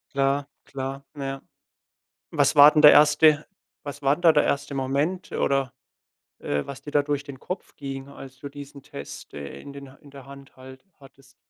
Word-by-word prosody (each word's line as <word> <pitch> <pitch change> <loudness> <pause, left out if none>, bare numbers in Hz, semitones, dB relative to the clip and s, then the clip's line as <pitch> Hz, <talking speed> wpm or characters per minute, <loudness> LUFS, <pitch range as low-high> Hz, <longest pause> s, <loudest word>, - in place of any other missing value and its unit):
Klar, 140 +1 +1 0.2
klar, 135 0 -6
ja. 135 -1 -5 0.9
Was 145 -2 +2
war 145 0 +9
denn 150 0 +2
der 150 - +10
1. 150 0 +5 0.4
Was 145 0 -8
war 140 0 +3
denn 175 - -14
da 170 - +7
der 150 - +3
1. 140 0 -2
Moment 140 +8 -2
oder, 135 -2 0 0.7
äh, 75 - -2
was 140 -1 -9
dir 145 - -9
da 145 0 +2
durch 145 -1 -2
den 140 -2 -10
Kopf 185 +6 -7
ging, 135 -1 -7
als 135 -2 -12
du 140 +1 -8
diesen 140 0 -11
Test, 70 - -10
äh, 70 -1 -8
in 140 - -11
den 140 -1 -11
Ha 135 - -19
in 145 - -18
der 135 -2 -13
Hand 140 0 -14
halt 130 +2 -13 0.2
hattest? 135 -1 -20
140 Hz, 195 wpm, -24 LUFS, 135-145 Hz, 0.9 s, der